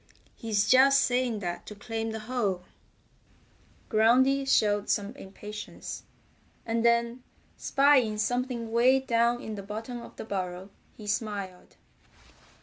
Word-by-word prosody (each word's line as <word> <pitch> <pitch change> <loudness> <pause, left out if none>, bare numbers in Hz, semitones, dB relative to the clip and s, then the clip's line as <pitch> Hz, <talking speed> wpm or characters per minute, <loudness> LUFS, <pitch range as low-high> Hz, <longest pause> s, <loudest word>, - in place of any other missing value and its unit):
He's 210 -2 0
just 275 +3 +6
saying 245 -3 0
that 175 -2 -5
to 210 - -8
claim 225 +2 -4
the 220 0 -5
hole." 215 -6 -2 1.2
Groundy 255 +5 +3
showed 205 -4 +2
some 205 +2 0
impatience, 210 -2 -8 0.6
and 230 0 -1
then 235 +1 +2 0.3
spying 270 -6 +3
something 245 0 -2
way 250 +3 +4
down 240 -1 +1
in 220 - -5
the 205 - -6
bottom 225 +4 -6
of - - -12
the - - -7
burrow 185 -1 -4 0.3
he 215 - -10
smiled. 205 -3 -4
225 Hz, 125 wpm, -28 LUFS, 205-245 Hz, 1.2 s, just